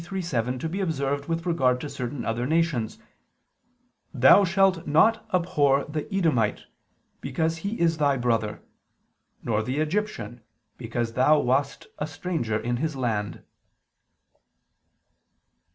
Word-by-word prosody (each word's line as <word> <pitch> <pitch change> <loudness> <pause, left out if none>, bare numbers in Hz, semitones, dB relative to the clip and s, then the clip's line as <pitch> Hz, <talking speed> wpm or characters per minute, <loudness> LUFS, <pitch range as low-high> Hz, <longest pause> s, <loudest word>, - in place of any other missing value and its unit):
23:7) 145 -10 -2
to 160 - -3
be 180 +5 -4
observed 140 -5 -1
with 165 +1 -2
regard 130 -8 +2
to 145 - -5
certain 125 -1 -5
other 120 +2 -1
nations: 155 -8 0 1.2
"Thou 130 +10 +7
shalt 190 -2 +2
not 215 +10 +4
abhor 150 -7 +2
the 150 +5 -5
Edomite, 155 - +1 0.6
because 160 0 -1
he 200 +7 -4
is 165 -1 +2
thy 145 -3 +2
brother; 115 -4 -1 0.8
nor 110 -2 0
the 125 +5 -3
Egyptian 155 - -2 0.3
because 115 -1 -3
thou 140 +5 +4
wast 135 +1 0
a 150 - -2
stranger 150 -8 -2
in 120 +2 -2
his 155 +2 -2
land." 110 -6 -2
145 Hz, 120 wpm, -25 LUFS, 120-165 Hz, 1.2 s, Thou